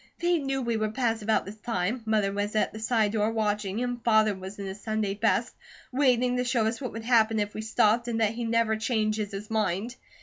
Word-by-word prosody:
They 345 -1 +2
knew 270 -2 -2
we 235 -1 0
would 215 0 -2
pass 230 -3 0
about 220 +1 +1
this 200 +3 -9
time. 215 +1 -2
Mother 210 -2 +2
was 205 +1 -2
at 215 - +1
the 215 - -7
side 220 -2 +1
door 215 0 +1
watching, 210 0 -1
and 245 -1 -4
Father 215 -2 +4
was 190 +1 -8
in 200 - -5
his 195 +2 -7
Sunday 215 -3 -1
best, 225 +3 +1 0.4
waiting 250 -2 +2
to 250 - +1
show 245 -3 +1
us 225 +4 -2
what 255 - -4
would 225 0 -7
happen 225 -2 +4
if 205 0 -2
we 215 - -4
stopped, 220 +1 +2
and 230 -1 -1
that 220 -1 +2
he 235 +1 -4
never 230 -1 +2
changes 215 -2 0
his 200 +2 -7
mind. 215 +2 -1
220 Hz, 230 wpm, -27 LUFS, 210-235 Hz, 0.4 s, Father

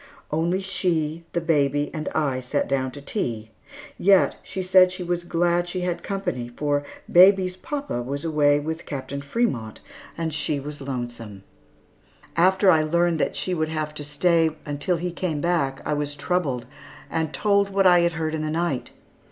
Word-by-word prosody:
Only 170 +5 0
she, 170 -4 -1
the 170 - 0
baby, 145 -3 +1
and 155 -2 -3
I 140 -5 +1
sat 130 +3 -1
down 130 -1 0
to 145 - -9
tea, 115 - -3 0.5
yet 195 0 +4
she 190 - -5
said 185 0 +6
that - - -9
she 185 0 -5
was 175 0 -2
glad 175 0 +1
she 180 +1 -3
had 180 -1 -2
company, 180 -11 -3
for 145 +3 -1 0.3
baby's 185 0 +6
papa 280 - -4
was 140 +5 -4
away 145 -2 +3
with 160 +3 -5
Captain 140 0 -5
Frémont, 140 - -1 0.4
and 165 -2 -2
she 145 -1 -1
was 145 +1 -8
lonesome. 120 -6 -6 0.9
After 190 +3 +5
I 160 -3 +4
learned 170 +1 +1
that - - 0
she 185 - -2
would 155 -2 -1
have 155 -1 -3
to 150 - -7
stay 160 +3 +2 0.2
until 145 +5 -1
he 175 +2 -3
came 170 -3 -2
back, 145 -5 0
I - - 0
was 145 0 -2
troubled, 145 -6 -1 0.4
and 160 -2 -2
told 200 +1 +2
what 195 0 +1
I 180 -1 +7
had 170 0 +2
heard 160 -1 -2
in 160 - -2
the 155 - -2
night. 160 -5 -1
160 Hz, 175 wpm, -24 LUFS, 145-180 Hz, 0.9 s, I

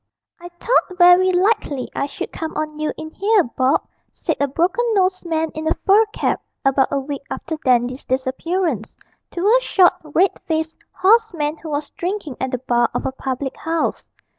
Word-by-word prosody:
'I 350 0 -9
thought 415 -6 +1
werry 355 +1 +6
likely 360 - +1
I 280 - -1
should 280 - -6
come 320 -1 -5
on 305 0 -3
you 305 - -1
in 315 0 -8
'ere, 420 -2 +5
Bob,' 260 0 0 0.3
said - - -2
a 285 - +2
broken 350 - 0
nosed 370 -2 +1
man 320 -1 -1
in 315 0 -5
a - - +2
fur 430 +2 +5
cap, - - -1 0.2
about 270 0 +3
a 280 - +1
week 280 0 -5
after 320 - -4
Dandy's 250 0 +1
disappearance, 265 - -2 0.3
to 350 +2 -3
a 485 +4 +5
short, 370 -7 +4
red 325 +5 +1
faced, 320 0 -2
hoarse 440 +1 +3
man 300 0 -2
who 320 - -9
was 295 0 -3
drinking 365 -7 -4
at 260 - -1
the 255 - -2
bar 240 -1 +1
of - - -2
a - - 0
public 265 0 -4
house. 325 0 -2
315 Hz, 185 wpm, -20 LUFS, 270-370 Hz, 0.3 s, werry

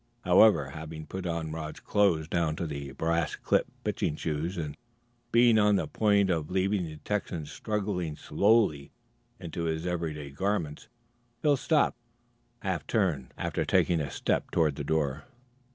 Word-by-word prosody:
However, 80 -12 +5
having 80 +1 -7
put 95 +1 -5
on 85 -2 -2
Rod's 80 -1 -6
clothes 90 -7 +2
down 85 -2 0
to 85 - -3
the 70 -3 -5
brass 85 +2 0
clipped - - +1
pitching 75 - -1
shoes 80 +4 -3
and 75 -3 -4 0.6
being 115 -1 +6
on 105 -1 +4
the - - +1
point 100 -3 +2
of 80 -3 -1
leaving 95 0 +1
the 80 -1 -8
Texan 90 -3 -3
struggling 95 -2 -3
slowly 100 -8 +2 0.5
into 85 -1 -4
his 80 +1 -2
everyday 80 -5 -3
garments, 85 -2 -2 0.6
Phil 150 -2 +5
stopped 150 -1 +1 0.6
and 95 - 0
half 90 - -4
turned, 85 - 0
after - - -1
taking 85 -2 +2
a 70 - -3
step - - -1
toward 80 -4 +2
the 70 - -4
door. 75 -1 -1
85 Hz, 150 wpm, -29 LUFS, 75-100 Hz, 0.6 s, being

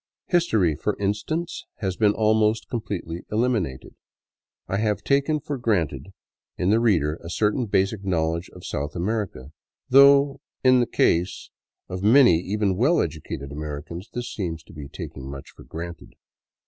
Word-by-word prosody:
History, 110 - +2
for 105 +7 -2
instance, 105 - -2
has 95 -3 -3
been 105 0 +3
almost 110 0 +2
completely 90 -7 -4
eliminated. 105 - -1 0.7
I 95 - -1
have 105 -2 0
taken 140 +2 +2
for 145 -1 -5
granted 85 - 0 0.5
in 90 +2 +1
the 110 - +4
reader 85 -10 +2
a 85 - -7
certain 110 +6 0
basic 100 +1 0
knowledge 85 -2 -1
of - - -13
South 70 +1 -4
America, 90 - -3 0.4
though 140 +1 +6 0.2
in 130 -1 +6
the 120 - +2
case 90 +3 +1 0.4
of 90 0 -5
many 110 -5 +6
even 100 +1 0
well 145 - +3
educated 75 -3 -4
Americans 75 +6 -6
this 120 -1 -5
seems 85 -6 -4
to - - -16
be 75 -3 -8
taking 65 -1 -8
much 70 -1 -9
for - - -15
granted. 85 +1 -8
100 Hz, 150 wpm, -24 LUFS, 80-115 Hz, 0.7 s, though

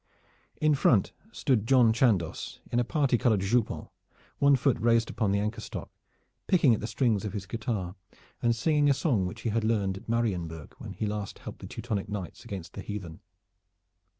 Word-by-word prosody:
In 155 0 +4
front 120 -7 +3 0.2
stood 125 - +1
John 125 -4 +5
Chandos 100 -9 0
in 120 - +2
a - - +3
party 135 -2 +1
colored 110 -6 +3
jupon, 110 +4 0 0.5
one 140 0 +6
foot 135 0 +1
raised 115 0 +3
upon 110 -4 0
the 100 - +2
anchor 105 +2 -2
stock, - - -7 0.6
picking 155 -10 +5
at 110 - 0
the 110 - -4
strings 115 -6 +1
of 105 - -4
his 100 -3 -4
guitar 110 -5 -3 0.5
and 120 -1 +2
singing 145 +4 +2
a 140 - +4
song 115 - +1
which 110 +6 -8
he 115 - -1
had 115 +1 0
learned 100 -4 +1
at 100 - -12
Marienburg 90 -9 -2
when - - -8
last 105 -2 -3
he - - -20
helped - - -8
the - - -8
Teutonic 105 -5 -4
knights 100 -5 -6
against 100 -7 -7
the 100 - -6
heathen. 95 -6 -6
110 Hz, 185 wpm, -28 LUFS, 100-120 Hz, 0.6 s, one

